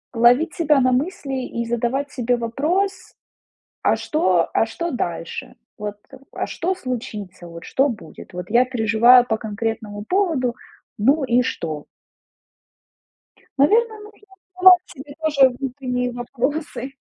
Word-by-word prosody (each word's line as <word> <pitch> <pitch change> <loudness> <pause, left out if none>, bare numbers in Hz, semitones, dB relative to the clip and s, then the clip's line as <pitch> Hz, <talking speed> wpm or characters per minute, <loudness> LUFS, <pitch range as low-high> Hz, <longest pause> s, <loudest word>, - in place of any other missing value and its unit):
ловить 245 +8 +4
себя 300 -4 +3
на 255 -1 +3
мысли 270 -1 -2
и 235 0 -4
задавать 240 +5 -1
себе 245 -1 0
вопрос: 330 - -2 0.7
"А - - +3
что 185 - +1
а - - +4
что 335 +10 -4
дальше? 245 - -4 0.2
Вот, 210 -1 -5 0.4
а - - -3
что 370 +3 -2
случится? 210 - -6
Вот 170 0 -10
что 270 +2 +1
будет? 220 -3 -10
Вот 180 0 -6
я 240 +3 +5
переживаю 240 0 +5
по 220 -2 0
конкретному 220 -1 -4
поводу, 320 - 0 0.4
ну 275 +7 +3
и 245 0 +3
что?" 155 - -4 1.7
Наверно, 435 - +3
нужно 420 0 -14 0.4
задавать 365 -1 +7
себе 285 +2 -11
тоже 280 -4 +4
внутренние 250 -1 -3
вопросы. 260 +3 -4
250 Hz, 125 wpm, -21 LUFS, 225-295 Hz, 1.7 s, задавать